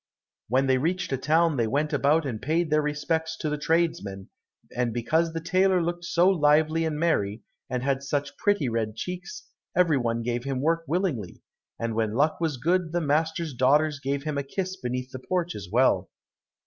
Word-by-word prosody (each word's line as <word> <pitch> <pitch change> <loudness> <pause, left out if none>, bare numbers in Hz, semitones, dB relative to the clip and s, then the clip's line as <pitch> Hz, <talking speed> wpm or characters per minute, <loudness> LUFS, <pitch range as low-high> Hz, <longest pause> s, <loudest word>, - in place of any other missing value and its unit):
When 130 +4 +2
they 130 -1 +3
reached 180 +5 -1
a - - +1
town 160 +3 +2
they 115 -2 +1
went 150 +6 0
about 145 +3 +3
and 115 -6 -4
paid 160 +3 0
their 155 0 +4
respects 160 +2 -2
to 155 - -2
the 150 - -1
tradesmen, 150 - -1 0.5
and 120 -1 0
because 160 +8 +1
the 165 - -3
tailor 185 +2 +2
looked 175 0 -2
so 175 +2 +3
lively 160 -2 +3
and 155 -2 -2
merry, 110 -10 0 0.3
and 125 -1 -2
had 135 0 0
such 140 +1 -2
pretty 205 -9 +1
red 115 -2 -2
cheeks, 180 +9 -6 0.3
every 170 -5 +4
one 115 -1 -1
gave 120 0 -2
him 135 -1 -2
work 165 +4 +1
willingly, 155 - -2 0.3
and 115 -1 -2
when 110 -1 -1
luck 150 +5 +1
was 160 -5 0
good 170 +4 0
the 175 - +2
master's 160 +1 0
daughters 145 +4 +3
gave 140 0 -2
him 150 -2 -2
a - - -2
kiss 185 +6 -3
beneath 125 -3 -4
the 130 - -6
porch, 175 +5 -2
as 100 -3 -8
well. 125 +4 +3
150 Hz, 190 wpm, -26 LUFS, 130-165 Hz, 0.5 s, their